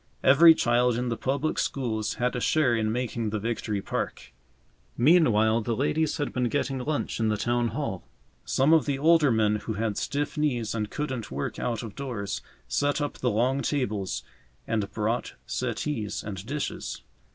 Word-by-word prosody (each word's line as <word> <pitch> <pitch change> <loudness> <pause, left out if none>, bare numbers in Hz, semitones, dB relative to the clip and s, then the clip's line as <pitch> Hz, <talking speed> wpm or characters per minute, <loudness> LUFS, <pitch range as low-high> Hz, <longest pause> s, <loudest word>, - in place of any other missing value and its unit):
Every 160 +5 +8
child 120 -1 +2
in 125 0 -1
the 115 - -1
public 140 +6 -1
schools 110 -5 -1
had 125 +1 0
a - - -1
share 130 -2 +2
in 110 -1 0
making 115 -2 -2
the 110 - -2
Victory 105 -2 -2
Park. - - -4 0.6
Meanwhile 115 -6 +4
the 115 +1 -1
ladies 150 +6 0
had 145 - -2
been 125 -1 0
getting 135 -1 -1
lunch 145 0 -2
in 110 - +2
the 105 -1 +1
Town 120 +2 +1
Hall. 115 -8 -3 0.4
Some 140 +4 +3
of 160 -2 +4
the 140 -2 0
older 155 -1 +4
men 105 -2 +2
who 110 +1 -4
had 110 -1 -2
stiff 145 +2 -2
knees 125 -7 0
and 105 -2 -2
couldn't 130 -7 -4
work 70 +2 -4
out 120 -1 -2
of 110 -3 -7
doors, 115 -8 -4 0.3
set 145 - +1
up 145 -1 -3
the 125 - +1
long 125 +5 +1
tables 105 -11 -1 0.4
and 105 -3 -1
brought 110 +3 -2
settees 120 -2 -3
and 95 -2 -6
dishes. 145 +2 -4
120 Hz, 175 wpm, -27 LUFS, 110-140 Hz, 0.6 s, Every